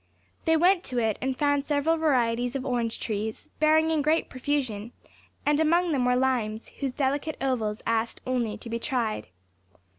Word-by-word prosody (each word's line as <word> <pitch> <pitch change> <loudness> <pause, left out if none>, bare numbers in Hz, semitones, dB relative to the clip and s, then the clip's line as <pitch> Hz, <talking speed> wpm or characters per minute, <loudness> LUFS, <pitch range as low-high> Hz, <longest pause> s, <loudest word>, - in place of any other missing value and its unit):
They 320 -1 +4
went 360 +2 +4
to 250 - -4
it, 220 -3 +1
and 260 0 -1
found 285 -1 +1
several 300 +2 +2
varieties 245 -5 +1
of 270 -1 -3
orange 240 -3 -1
trees, 215 0 -4
bearing 315 +1 +4
in 315 -2 +2
great 310 +3 +1
profusion, 255 -5 -2 0.5
and 295 0 +3
among 340 +2 +3
them 265 -4 +1
were 250 0 +3
limes, 240 -4 0
whose 275 -2 -1
delicate 285 +4 -1
ovals 230 -6 -1
asked 225 0 0
only 240 -4 -1
to - - -11
be 230 0 -3
tried. 235 - -2
260 Hz, 170 wpm, -27 LUFS, 230-295 Hz, 0.5 s, They